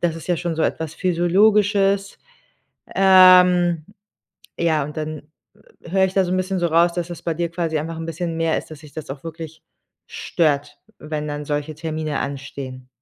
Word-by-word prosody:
Das 170 Hz, -2 st, 0 dB
ist 165 Hz, -, -10 dB
ja 175 Hz, -, +2 dB
schon 170 Hz, -1 st, -3 dB
so 160 Hz, -, 0 dB
etwas 160 Hz, -1 st, -2 dB
Physiologisches. 195 Hz, +3 st, +2 dB, 0.8 s
Ähm, 180 Hz, -3 st, +6 dB, 0.7 s
ja, 160 Hz, -3 st, +1 dB
und 150 Hz, +2 st, -9 dB
dann 155 Hz, -1 st, -5 dB, 0.6 s
h 170 Hz, -, -10 dB
höre 190 Hz, 0 st, +4 dB
ich 190 Hz, -, -4 dB
da 195 Hz, -, +4 dB
so 180 Hz, -, -3 dB
'n 185 Hz, -, +1 dB
bisschen 185 Hz, 0 st, -1 dB
so 170 Hz, -, +1 dB
raus, 170 Hz, +1 st, +3 dB
dass 175 Hz, 0 st, -3 dB
es 170 Hz, -, -8 dB
bei 165 Hz, -, -1 dB
dir 170 Hz, +1 st, -2 dB
quasi 170 Hz, -2 st, -2 dB
einfach 165 Hz, +2 st, -5 dB
'n 165 Hz, -, -5 dB
bisschen 165 Hz, 0 st, -4 dB
mehr 165 Hz, -1 st, +1 dB
ist, -, -, -7 dB
dass 155 Hz, -, -9 dB
dich 150 Hz, -2 st, -15 dB
das 155 Hz, -, -8 dB
auch 135 Hz, +2 st, -7 dB
wirklich 160 Hz, -1 st, -9 dB, 0.4 s
stört, 145 Hz, -3 st, -1 dB, 0.2 s
wenn 150 Hz, 0 st, -4 dB
dann 145 Hz, 0 st, -5 dB
solche 150 Hz, +1 st, -3 dB
Termine 155 Hz, -1 st, -3 dB
anstehen. 135 Hz, -2 st, -6 dB
165 Hz, 190 wpm, -21 LUFS, 155-180 Hz, 0.8 s, Ähm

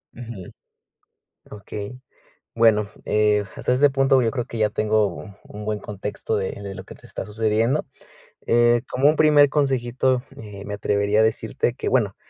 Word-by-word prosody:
Ujú. 115 Hz, -6 st, -9 dB, 1.0 s
Okey. 105 Hz, +3 st, -8 dB, 0.5 s
Bueno, 110 Hz, -3 st, +3 dB
eh, 105 Hz, -1 st, +2 dB
hasta -, -, -1 dB
este 140 Hz, +3 st, +5 dB
punto, 135 Hz, -1 st, +3 dB
yo 115 Hz, -, +1 dB
creo 125 Hz, -3 st, -2 dB
que 115 Hz, -, -7 dB
ya 110 Hz, -1 st, +3 dB
tengo 110 Hz, 0 st, +1 dB, 0.4 s
un 105 Hz, 0 st, -9 dB
buen 105 Hz, 0 st, -2 dB
contexto 105 Hz, +2 st, -4 dB
de 95 Hz, -2 st, -2 dB
de 100 Hz, -1 st, -7 dB
lo -, -, -9 dB
que -, -, -12 dB
te -, -, -17 dB
está -, -, -6 dB
sucediendo. 110 Hz, +5 st, 0 dB, 0.6 s
Eh, 120 Hz, 0 st, +4 dB
como 135 Hz, +3 st, +2 dB
un 155 Hz, -, +2 dB
primer 150 Hz, -2 st, +6 dB
consejito, 130 Hz, -3 st, 0 dB
eh, 105 Hz, -2 st, -9 dB
me 105 Hz, -, -4 dB
atrevería 100 Hz, +1 st, +1 dB
a -, -, +5 dB
decirte 110 Hz, 0 st, 0 dB
que, -, -, -3 dB
bueno, -, -, +1 dB
110 Hz, 165 wpm, -23 LUFS, 105-125 Hz, 1.0 s, primer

